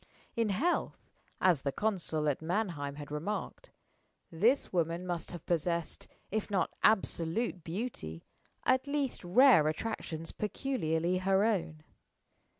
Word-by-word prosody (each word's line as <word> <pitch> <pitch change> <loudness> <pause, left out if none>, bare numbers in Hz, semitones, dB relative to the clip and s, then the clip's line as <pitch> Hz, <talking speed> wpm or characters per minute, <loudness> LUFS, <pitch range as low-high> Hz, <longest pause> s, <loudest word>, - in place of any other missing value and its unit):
In 230 -2 +1
health 290 - 0 0.4
(as 175 -7 +4
the 140 - -1
consul 170 -6 -1
at 145 0 0
Mannheim 165 -5 -2
had 145 0 -8
remarked) 165 +8 -4 0.6
this 220 +12 +2
woman 170 0 0
must 175 -3 -3
have 175 -3 -8
possessed, 170 -1 -1 0.2
if 215 +1 -1
not 190 -4 0
absolute 190 -1 +2
beauty, 165 - -5 0.4
at 260 +2 +3
least 280 -5 -1
rare 180 - +6
attractions 165 -2 -3
peculiarly 185 - -1
her 190 +1 +3
own. 170 -8 0
180 Hz, 120 wpm, -32 LUFS, 160-220 Hz, 0.6 s, rare